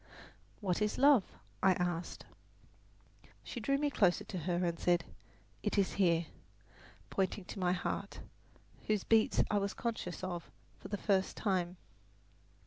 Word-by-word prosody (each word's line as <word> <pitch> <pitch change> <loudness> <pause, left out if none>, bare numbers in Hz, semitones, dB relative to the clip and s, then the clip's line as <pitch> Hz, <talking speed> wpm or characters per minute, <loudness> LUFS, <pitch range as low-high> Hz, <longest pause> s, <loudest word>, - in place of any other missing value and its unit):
"What 185 -1 0
is 210 0 0
love?" 275 -6 +5 0.3
I 190 - +5
asked. 175 -1 -3 1.2
She 245 - -6
drew 275 +5 +1
me 290 0 0
closer 185 -9 +3
to 185 - -6
her 175 - +2
and 170 -1 -1
said, 175 -1 +2 0.6
"It - - -1
is 195 -2 +3
here," 170 -3 +3 0.9
pointing 190 0 -1
to 195 - -7
my 180 -1 +2
heart, 180 - -3 0.7
whose 215 -3 +1
beats 225 -1 +4
I 205 - +3
was 200 0 -2
conscious 220 -7 -4
of 175 -2 -4 0.3
for - - -9
the 205 - -3
first 195 -2 +1
time. 185 -4 0
190 Hz, 140 wpm, -34 LUFS, 175-210 Hz, 1.2 s, love